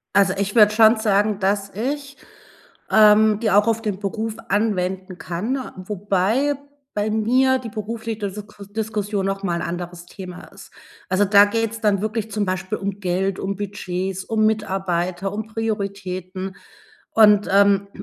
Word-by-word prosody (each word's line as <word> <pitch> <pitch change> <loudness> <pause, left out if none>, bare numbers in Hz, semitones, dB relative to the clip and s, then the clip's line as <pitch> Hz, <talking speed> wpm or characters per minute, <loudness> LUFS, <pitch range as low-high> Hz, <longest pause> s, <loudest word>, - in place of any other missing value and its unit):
Also, 195 -2 +4
ich 200 +2 -2
würde 210 -2 +7
schon 220 +1 +6
sagen, 210 -1 +1
dass 200 0 0
ich, 280 +6 -4 0.7
ähm, 215 0 +6
die 225 -2 +1
auch 205 +2 +4
auf 225 0 0
den 210 -4 -2
Beruf 215 +2 -3
anwenden 190 -3 -1
kann, 210 +10 -3 0.2
wobei 205 +8 0 0.4
bei 210 +1 0
mir 255 +5 +3
die 245 -2 -7
berufli 220 +1 -5
desoko 205 0 -7
Diskussion 205 -1 -3
noch 195 0 -2
mal 175 -3 -1
‘n 170 - -3
anderes 175 0 -6
Thema 180 -1 -9
ist. - - -14 0.4
Also, 195 +2 +3
da 200 +1 +7
geht's 225 +1 -2
dann 205 -3 +2
wirklich 215 +1 -3
zum 205 -1 -1
Beispiel 185 +3 -2
um 200 0 -4
Geld, 185 +1 -1
um 195 +1 -3
Budgets, 190 -2 -4
um 220 -1 +1
Mitarbeiter, 190 -3 -1
um 215 +1 -4
Prioritäten. 195 -4 -4 0.5
Und, 210 -2 +5
ähm, 200 0 +4
205 Hz, 150 wpm, -22 LUFS, 190-220 Hz, 0.7 s, würde